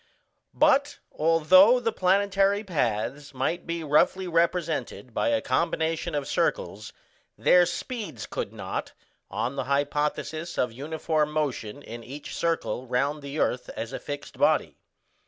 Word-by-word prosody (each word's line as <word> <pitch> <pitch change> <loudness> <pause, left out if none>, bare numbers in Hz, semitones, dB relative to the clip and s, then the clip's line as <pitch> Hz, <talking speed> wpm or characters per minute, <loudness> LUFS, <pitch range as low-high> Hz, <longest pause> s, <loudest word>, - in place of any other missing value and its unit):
But 285 +2 +3
although 175 +9 +5
the 230 -2 0
planetary 195 +1 +2
paths 140 - -2
might 165 +7 -2
be 170 -1 -3
roughly 160 +5 +2
represented 165 -6 -1
by - - 0
a 285 -1 +2
combination 165 -1 0
of 145 -2 -2
circles, - - -1 0.5
their 180 -1 +5
speeds 175 - -5
could - - -4
not, - - -5 0.4
on 135 +3 -3
the - - -1
hypothesis 145 +3 -1
of 125 - 0
uniform 150 +3 -1
motion 145 -4 -3
in 115 +1 -8
each 140 +5 -8
circle 165 -6 -1
round 140 +5 0
the 140 +1 -6
earth 125 -4 0
as 115 - -5
a - - -4
fixed 145 0 -7
body. - - +2
155 Hz, 135 wpm, -26 LUFS, 140-180 Hz, 0.5 s, although